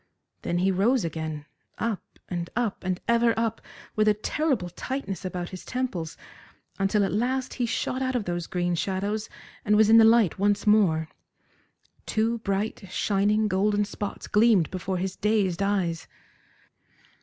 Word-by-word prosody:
Then 175 - -1
he 190 +2 +2
rose 205 +3 +2
again, 155 -2 -4 0.3
up 225 -4 -2 0.3
and 175 -1 -4
up, 235 -4 -1
and 185 -1 -1
ever 235 0 +3
up, 225 -1 -1 0.3
with 215 0 +2
a 210 - +5
terrible 235 - -1
tightness 200 -2 -4
about 180 -1 -4
his 185 - -9
temples, 245 -11 -3 0.6
until 200 +1 +2
at - - -2
last 255 +4 -1
he 245 -2 -1
shot 255 +3 -2
out 260 -1 -1
of 230 -5 -1
those 175 -1 -3
green 175 -1 -1
shadows 200 +5 -2 0.3
and 210 - +3
was 215 0 +5
in 225 - +9
the - - +8
light 225 -5 +4
once 205 +1 +1
more. 190 -7 +3 1.0
Two 225 +2 0
bright, 200 0 -2
shining, 210 +3 +1
golden 205 +2 +1
spots 205 0 -6
gleamed 210 -6 +3
before 185 0 -3
his 190 +1 -3
dazed 200 -4 +1
eyes. 190 -5 0
205 Hz, 155 wpm, -26 LUFS, 185-225 Hz, 1.0 s, in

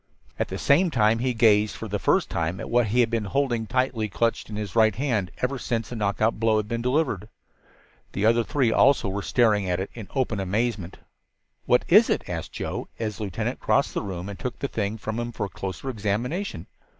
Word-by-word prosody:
At - - 0
the - - -5
same 170 +6 +3
time 115 -5 +3
he 125 0 0
gazed 105 -2 +4
for 110 - -6
the 105 0 -2
first - - +2
time 85 +2 -2
at - - -6
what 120 -1 +3
he 120 +5 +3
had 115 -1 +1
been 115 -2 0
holding 120 0 0
tightly 125 -4 0
clutched 115 +3 -1
in 105 - -6
his 105 -4 -5
right 110 -2 +4
hand 115 -8 -1
ever 130 +1 0
since 115 -3 -2
the 120 - -6
knockout 110 +1 0
blow 110 -1 +3
had 105 -1 -1
been 115 +1 -2
delivered. 125 - 0 0.8
The 100 - 0
other 115 +1 +4
three 135 -3 +1
also 130 -4 +4
were 100 +2 -3
staring 105 -3 +2
at 90 0 0
it 95 - -4
in 110 -5 -8
open 125 -6 0
amazement. 100 -1 -2 0.7
"What 125 - +3
is 210 +6 +6
it?" - - 0
asked 80 -2 -5
Joe, - - -4
as 110 -3 -3
the 110 - -3
lieutenant 95 - -3
crossed - - +1
the - - -1
room 95 -2 -5
and 100 -2 -7
took 125 -2 -4
the 140 - -2
thing 105 -3 -2
from 110 +1 -4
him 120 0 -3
for 115 - -3
a - - -7
closer 95 +7 -6
examination. 115 - -2
110 Hz, 220 wpm, -25 LUFS, 100-120 Hz, 0.8 s, is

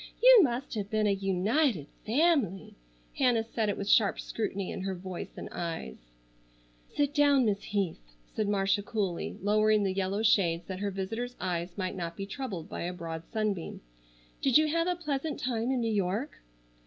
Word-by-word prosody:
You - - +9
must 260 -3 0
have 205 -3 -3
been 215 0 +1
a 205 - +3
united 195 - +1 0.2
family." 260 - +2 0.5
Hannah 245 -4 +3
said 225 -1 -1
it 205 - -1
with 200 - -4
sharp 205 -1 +4
scrutiny 200 -4 -3
in 185 - -5
voice 180 0 -7
and - - -6
eyes. 165 - -4 1.0
"Sit 290 -1 +1
down, 285 -3 +4
Miss 205 -2 +1
Heath," 195 - -2 0.3
said 215 -2 0
Marcia 195 0 +2
coolly, 200 -4 -3
lowering 215 +1 +3
the 190 -1 0
yellow 195 +2 -1
shades 175 -6 +3
that 185 -1 -6
her 205 0 -1
visitor's 225 +6 -4
eyes 175 -1 -3
might 185 0 -2
not 170 -2 -5
be 195 - -4
troubled 200 - -5
by - - -6
a 175 +1 -3
broad 165 -2 -6
sunbeam. 210 -6 -2 0.6
"Did 270 0 +5
you 310 0 +3
have 335 +2 +1
a 360 - +1
pleasant 305 -3 -3
time 240 -1 -1
in 260 -2 +1
New 225 -1 0
York?" 205 +8 -1
205 Hz, 175 wpm, -30 LUFS, 190-250 Hz, 1.0 s, You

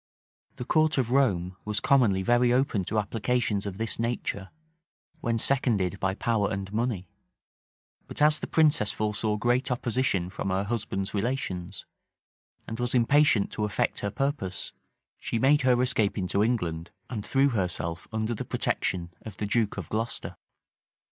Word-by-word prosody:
The 125 - -6
court 155 +2 +2
of 125 -3 0
Rome 95 -10 +1
was 105 -1 -1
commonly 110 -8 +3
very 120 +3 +3
open 125 -6 +1
to 110 - -2
applications 110 0 0
of 95 -2 -5
this 115 +1 -2
nature, 115 -4 -2 0.7
when 115 0 0
seconded 110 -7 +1
by 95 0 0
power 110 -3 0
and 95 0 -4
money; 110 -5 -1 1.0
but - - -7
as 150 0 +4
the - - -5
princess 150 -10 +3
foresaw 105 0 -1
great 120 +4 +1
opposition 120 -7 0
from 95 - -3
her 95 +1 0
husband's 100 -3 -3
relations, 95 -7 -3 0.8
and 115 +1 -5
was 120 +1 -1
impatient 125 -3 +4
to 105 - -3
effect 105 -1 0
her 100 - -2
purpose, 105 -5 -2 0.5
she - - -2
made 140 +5 +4
her 125 -2 +3
escape 115 -5 +1
into 100 +1 +1
England, 90 -9 -1 0.2
and 110 -5 -5
threw 135 +4 +3
herself 90 - -2
under 110 +1 -1
the 110 - -4
protection 85 -1 -1
of 105 -4 -9
the 105 - -2
duke 105 0 0
of 90 -6 -5
Glocester. 115 +2 -3
110 Hz, 155 wpm, -27 LUFS, 95-125 Hz, 1.0 s, as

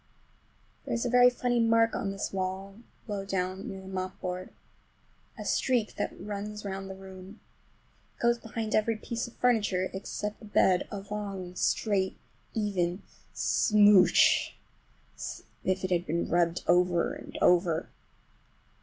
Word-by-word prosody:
There - - -2
is 235 - -1
a 240 - 0
very 250 0 +7
funny 245 -1 0
mark 230 0 +4
on 200 - -2
this 195 0 -4
wall, 190 +1 -3 0.3
low 205 -2 -3
down, 190 0 -3
near 190 0 -7
the 190 - -12
mopboard. 185 -1 -4 0.9
A - - -7
streak 245 -5 +1
that - - -3
runs 210 0 -6
round 195 0 -5
the 190 - -6
room. 190 +2 -11 0.8
It - - -16
goes 235 0 +3
behind 225 -1 -4
every 220 +1 +2
piece 235 +2 -4
of 235 - -14
furniture, 205 -7 +1
except 210 +2 -5
the 225 - -12
bed, 190 -3 +3
a 200 -1 -6
long, 195 -4 -4
straight, 190 0 0 0.4
even 195 -3 -1 0.3
smooch, 205 -4 +5 0.6
as - - -6 0.2
if 185 0 0
it 185 - -2
had 175 0 +1
been 170 +2 -1
rubbed 170 0 +2
over 175 -1 +3
and - - -9
over. 175 -2 +3
195 Hz, 145 wpm, -29 LUFS, 185-215 Hz, 0.9 s, very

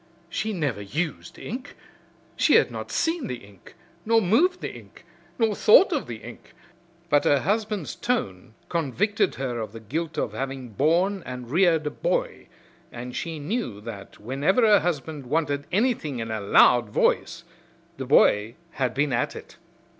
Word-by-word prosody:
She 215 +5 -2
never 145 - -2
used 150 - -4
ink. 250 +4 -7 0.6
She - - +4
had - - +4
not - - -6
seen 325 -3 0
the 125 - -3
ink, 100 -3 -18 0.3
nor 225 +1 +4
moved 290 - +2
the - - -5
ink, - - -14 0.3
nor 225 -3 +2
thought 280 - +6
of 295 - -2
the 115 -3 -8
ink, 120 +1 -12 0.5
but 145 -3 +3
her 145 -2 +3
husband's 210 -2 -1
tone 115 - -3
convicted 190 - 0
her 125 -3 -3
of 110 -2 -5
the 115 - -8
guilt 155 +9 -4
of - - -2
having 135 -2 -5
borne 170 - +1
and 125 -1 -8
reared 165 -2 +3
a 150 - -1
boy, - - -2 0.4
and 125 +1 -7
she 165 +2 -4
knew 150 - -3
that 105 -3 -9
whenever 140 - +1
her 210 -2 +6
husband 150 -4 -3
wanted 145 -1 -1
anything 200 - 0
in 115 -1 -4
a 110 -1 -3
loud 120 +3 +5
voice 170 +10 0 0.5
the 135 - -4
boy 110 -4 +4 0.2
had 130 -5 -2
been 140 -1 +1
at - - -1
it. - - -11
150 Hz, 160 wpm, -25 LUFS, 120-200 Hz, 0.6 s, thought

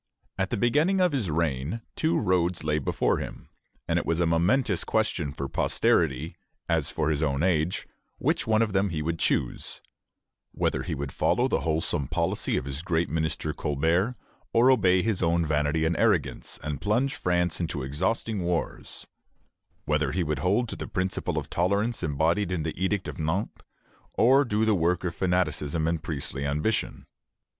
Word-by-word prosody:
At 95 0 -1
the 120 - -1
beginning 150 - +2
of 180 -2 +3
his 125 - -1
reign 80 - -1
two 160 +1 +1
roads 90 -2 +1
lay 75 0 +1
before 70 - +1
him, - - -8 0.4
and - - +2
it - - -5
was 85 0 +1
a 85 - +3
momentous 85 +5 +2
question 95 -9 0
for 70 -1 -4
posterity, 75 +2 +1 0.3
as 80 -3 +1
for 80 -1 0
his 75 0 -1
own 70 -1 0
age, 90 -1 +1 0.3
which - - 0
one 110 0 +4
of 105 -3 -2
them 100 +1 +2
he 80 -3 -3
would 85 +1 -2
choose, - - -1 0.7
whether - - 0
he - - -3
would 70 -1 -4
follow - - +2
the - - +1
wholesome 75 -3 0
policy - - -1
of - - -2
his 70 +2 -4
great 85 -1 0
minister 80 -1 -1
Colbert, 80 - 0 0.4
or 120 +3 +6
obey 95 -7 +4
his 110 -4 0
own 85 -1 +2
vanity 75 +1 +1
and 80 +1 +1
arrogance, - - 0
and 75 -3 -4
plunge 120 +7 +1
France 90 -1 0
into 80 -5 -2
exhausting 95 +9 -1
wars; 85 -1 -3 0.8
whether 75 -2 +1
he 90 - +1
would 75 -1 -2
hold 105 +7 +1
to - - -5
the - - -6
principle 95 0 -2
of - - -2
tolerance 100 +6 0
embodied 85 +5 +1
in 85 -4 -1
the 80 - -2
Edict 95 +2 -1
of - - -6
Nantes, 80 +7 -2 0.5
or 135 +4 +5
do 110 -1 +1
the 110 - +3
work 90 0 +1
of 90 -2 -2
fanaticism 85 -4 0
and 80 -1 0
priestly 70 -3 -3
ambition. 75 +10 -1
85 Hz, 175 wpm, -27 LUFS, 75-100 Hz, 0.8 s, or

